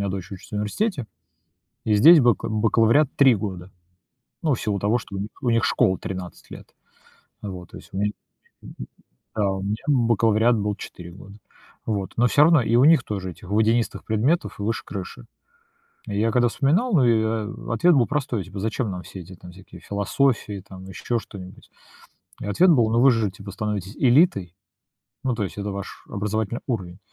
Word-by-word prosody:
меня 100 - -1
дочь 95 -3 -6
учится 95 +2 -10
в - - -1
университете, 135 - -2 0.8
и 110 - +1
здесь 160 +10 +8
бака 120 -7 +2
бакалавриат 115 +6 +3
3 135 -4 +5
года. 95 -3 -6 0.7
Ну, 155 -4 +2
в - - -5
силу 105 -2 -1
того, 105 +4 +1
что 100 -3 -9
у - - -3
них 100 +2 -4
у 125 - +1
них 115 0 +2
школа 95 -1 +2
13 90 -2 -8
лет, - - -10 0.8
вот. 90 -4 -7
То - - -9
есть - - -15
у - - -5
ме 100 - +1
мгм, 105 - -2 1.2
да, 100 -2 +1
у 95 0 -4
меня 100 +2 -2
бакалавриат 115 -3 +3
был 105 -1 -1
4 85 -3 -10
года. 100 +2 -13 0.5
Вот. 100 -4 -2
Но 120 - +4
все 145 - +4
равно 165 -2 +5
и 115 +1 +1
у 125 - +5
них 160 -3 +6
тоже 95 -3 -4
этих 90 - -15
водянистых 110 +2 +1
предметов 110 - 0
выше 105 +3 -2
крыши. 100 +4 -7 0.8
Я 105 +2 0
когда 120 0 +3
вспоминал, 165 - +1
ну 150 -7 +4
и, 115 -2 +3
а, 110 0 -3
ответ 175 +8 +4
был 125 -4 +4
простой. 135 -8 -2
Типа, 100 +1 -9
зачем 110 +2 -2
нам 90 -1 -6
все 95 - -9
эти 90 +1 -12
всякие 95 +2 -14
философии, 100 0 -1
там 95 -1 -11
еще 95 +5 -3
что-нибудь? 95 -4 -12 0.7
И - - -5
ответ 170 - +3
был: 120 -8 +3
ну 115 +1 +3
вы 135 0 +7
же, 115 -3 +1
типа, 100 +1 -10
становитесь 100 -1 -4
элитой, 120 - +3 0.7
ну 130 - 0
то 110 -3 -2
есть 95 - -7
это 100 0 -3
ваш 100 0 -8
образовательный 105 +3 -2
уровень. 95 -8 -4
110 Hz, 185 wpm, -23 LUFS, 100-120 Hz, 1.2 s, здесь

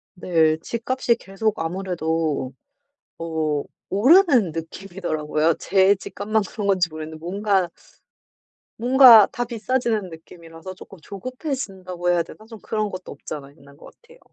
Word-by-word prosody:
네. 160 -3 +2
집값이 235 +1 -1
계속 210 -1 -3
아무래도 165 -5 -2 0.7
어 160 -3 -2 0.3
오르는 250 - +4
느낌이더라고요. 165 -2 -2
제 195 +1 +3
집값만 210 +2 -2
그런 210 -3 -5
건지 185 -3 +2
모르겠는데 155 0 -8
뭔가 190 +2 0 1.1
뭔가 245 -3 +8
다 245 - -1
비싸지는 230 -3 -2
느낌이라서 165 +2 -11
쪼끔 190 -1 -14
조급해진다고 195 - -4
해야 170 -1 +2
되나? 215 - -14
좀 225 -2 -11
그런 215 -1 -2
것도 185 -1 -8
없잖아 140 -2 -8
있는 140 -1 -19
것 145 - -15
같아요. - - -20
190 Hz, 310 characters per minute, -22 LUFS, 165-220 Hz, 1.1 s, 뭔가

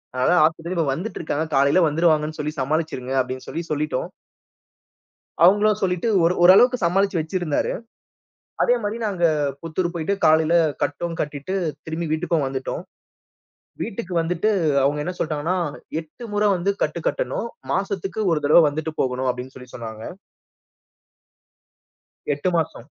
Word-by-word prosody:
அதனால 130 +8 +3
ஆஸ்பத்திரிலருந்து 165 -2 -1
வந்துட்டுருக்காங்க. 160 -3 -3
காலைல 140 +6 +4
வந்துருவாங்கன்னு 155 -1 +1
சொல்லி 150 +1 -2
சமாளிச்சிருங்க" 135 -3 -2
அப்பிடின்னு 130 0 -6
சொல்லி 170 - -4
சொல்லிட்டோம். 150 -3 -1 1.3
அவுங்களும் 205 +3 +5
சொல்லிட்டு 180 +3 0
ஒ 190 - +5
ஒரு 175 - +3
ஓரளவுக்கு 245 +8 +7
சமாளிச்சு 190 +1 +2
வச்சிருந்தாரு. 160 -1 -1 0.9
அதேமாரி 230 -2 +1
நாங்க 190 -4 -2 0.4
புத்தூரு 170 +2 -2
போயிட்டு 170 +3 -1
காலையில 160 +1 +4 0.3
கட்டும் 170 +3 -3
கட்டிட்டு, 150 +4 -4 0.3
திரும்பி 160 +1 -3
வீட்டுக்கும் 160 -2 0
வந்துட்டோம். 135 +5 -4 1.0
வீட்டுக்கு 195 -5 -4
வந்துட்டு, 175 +5 0 0.3
அவுங்க 145 +2 +1
என்ன 180 - -3
சொல்ட்டாங்கன்னா, 160 +3 -1 0.4
8 160 +9 -14
முறை 210 0 +3
வந்து 180 +3 0
கட்டு - - -2
கட்டணும். - - -2 0.3
மாசத்துக்கு 195 0 -2
1 155 -2 +1
தடவை 155 +4 +7
வந்துட்டு 155 +2 -4
போகணும். 130 0 -1
அப்பிடின்னு 125 +1 -5
சொல்லி 125 -1 -12
சொன்னாங்க. 110 -2 -7 2.3
8 145 +6 -1
மாசம். 155 -7 -3
165 Hz, 125 wpm, -22 LUFS, 145-185 Hz, 2.3 s, ஓரளவுக்கு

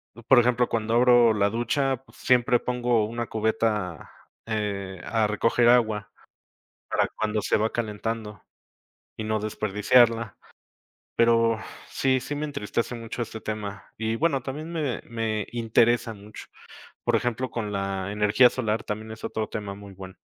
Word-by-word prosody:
Mm, 120 - -11
por 130 - +7
ejemplo, 120 0 +3
cuando 115 0 -1
abro 120 -2 +6
la 100 -1 +2
ducha, 130 +4 0
pues, - - -21
siempre 125 0 +3
pongo 120 -2 +1
una 120 +2 -4
cubeta, 110 -5 -1 0.4
eh, 100 -4 -3
a 110 -1 +1
recoger 115 +3 +2
agua 110 -4 +3 0.8
para - - +1
cuando 110 0 0
se - - +2
va 110 +1 0
calentando 110 -2 -4 0.7
y 110 - -5
no 110 0 -1
desperdiciarla. 110 +1 +2 0.8
Pero 115 -1 +3 0.3
sí, 130 -1 +1
sí 145 +3 -5
me 150 +1 -2
entristece 120 -3 -3
mucho 115 +1 -6
este 110 0 -8
tema, 105 -2 -6
y, 110 +1 -1
bueno, 140 -1 +1
también 150 +6 -6
me 150 -8 -2
me 110 -3 -2
interesa 115 0 +2
mucho. 105 +1 -11 0.6
Por - - +3
ejemplo, 125 +1 -2
con 105 -3 -4
la 100 0 -2
energía 105 +4 +5
solar 110 -3 -2
también 110 +1 -5
es 110 - -11
otro 110 -1 -3
tema 100 -2 -5
muy 100 -1 -12
bueno. 95 0 -10
115 Hz, 150 wpm, -26 LUFS, 105-120 Hz, 0.8 s, por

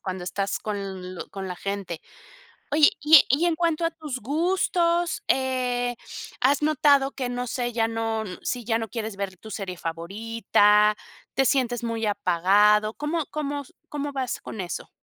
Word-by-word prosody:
cuando 185 -1 -5
estás 195 +2 -2
con 195 -3 -5
lo - - -7
con 195 -1 -6
la 180 - -4
gente. 195 -4 -4 0.7
Oye, 300 +2 +6
y 310 +2 +9
e - - +7
y 285 +7 +3
en 340 -2 +2
cuanto 335 0 +1
a 330 - +1
tus 305 -6 -6
gustos, 340 - +1
eh, 250 -2 0 0.4
¿has 275 +4 +3
notado 285 -2 +4
que, 255 -2 -4
no 245 0 -3
sé, 245 0 -2
ya 225 -1 +1
no 225 -1 -2 0.2
si 245 -1 -3
ya 225 0 +1
no 225 - -3
quieres 220 -2 -4
ver 195 -2 -4
tu 220 +5 -11
serie 190 -4 -5
favorita, 210 +4 +2 0.4
te 270 - +2
sientes 245 -3 +1
muy 230 -1 -2
apagado? 205 +2 +3
¿Cómo 300 +3 -2
cómo 290 -1 -3
s 275 - -16 0.2
cómo 290 -1 -3
vas 260 -3 -2
con 215 - -6
eso? 175 -3 -5
235 Hz, 170 wpm, -25 LUFS, 205-285 Hz, 0.7 s, y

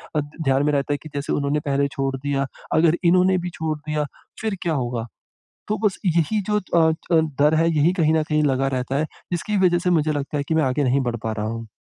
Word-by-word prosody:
अ, - - +3 0.2
ध्यान 135 -2 +2
में 150 - +2
रहता 140 0 0
है - - -1
कि 155 - -9
जैसे 140 0 -2
उन्होंने 145 +1 0
पहले 140 0 +1
छोड़ 135 -1 -2
दिया, 140 0 -1 0.3
अगर 160 +1 +4
इन्होंने 185 +2 +4
भी 180 0 -3
छोड़ 160 -1 -2
दिया, 150 0 -2 0.4
फिर 220 -2 -1
क्या 170 - 0
होगा? 120 -5 -2 0.6
तो 215 - 0
बस 195 - 0
यही 170 +4 +2
जो 210 - +3
अ 170 -4 +2 0.3
अ, 165 - +6 0.2
डर 150 +2 +5
है 165 +1 +3
यही 160 +2 +3
कहीं 165 -4 +2
न 160 - +3
कहीं 150 0 0
लगा 135 -1 +1
रहता 125 +2 -2
है, 155 - 0 0.3
जिसकी 205 +4 -1
वजह 175 -1 +3
से 180 +1 0
मुझे 155 -3 +2
लगता 145 0 -3
है 140 - -1
कि 160 - +1
मैं 160 - +3
आगे 135 +2 +1
नहीं 130 +2 +2
बढ़ 120 - -4
पा 110 - -1
रहा 105 -1 -3
हूँ। 115 +1 -5
150 Hz, 245 wpm, -22 LUFS, 140-170 Hz, 0.6 s, अ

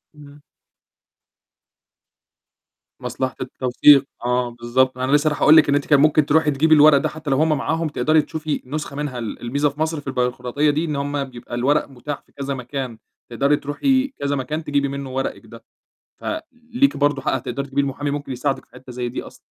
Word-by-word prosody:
إمم. 145 0 -15 2.6
مصلحة 130 -2 -3
التوثيق، 130 +2 +4 0.2
آه، 125 0 +1
بالضبط، 120 +2 0
أنا 130 +1 -1
لسّة 145 +1 +3
رايح 150 - -1
أقول 155 +1 +7
لِك 150 - +5
إن 140 - +3
أنتِ 145 - 0
كان 145 -2 +4
ممكن 155 0 +4
تروحي 155 +1 +3
تجيبي 155 +3 +4
الورق 150 -1 +7
ده - - 0
حتّى 155 -2 -7
لو 135 - +2
هُم 160 +2 +2
معاهم 160 +3 -1
تقدري 155 +1 +2
تشوفي 155 0 -4
نسخة 145 +1 -5
منها، 145 -4 -4
ال 115 -3 -6
الميزة 140 +5 0
في 145 +2 -15
مصر 160 0 -1
في 145 - -17
البيروقراطية 125 +2 0
دي، 150 +3 0
إن 150 -3 -3
هُم 140 0 -2
بيبقى 120 -2 -9
الورق 140 +5 +1
متاح 140 +2 -6
في - - -30
كذا 140 0 -4
مكان، 125 -2 -5 0.3
تقدري 140 +5 +2
تروحي 260 - +1
كذا 140 0 -1
مكان 150 +4 -3
تجيبي 145 -2 0
منه 140 -1 -5
ورقِك 135 0 -3
ده، - - -13 0.6
فليكِ 255 - -2
برضو 145 -1 +1
حق - - -1
هتقدري 140 +2 -3
تجيبيه 140 +1 0
المحامي 140 +1 -3
ممكن 145 -1 -4
يساعدك 135 +2 -2
في - - -42
حتّة 130 -1 -12
زي 125 0 -3
دي 120 - -5
أصلًا. - - -13
140 Hz, 190 wpm, -21 LUFS, 130-150 Hz, 2.6 s, أقول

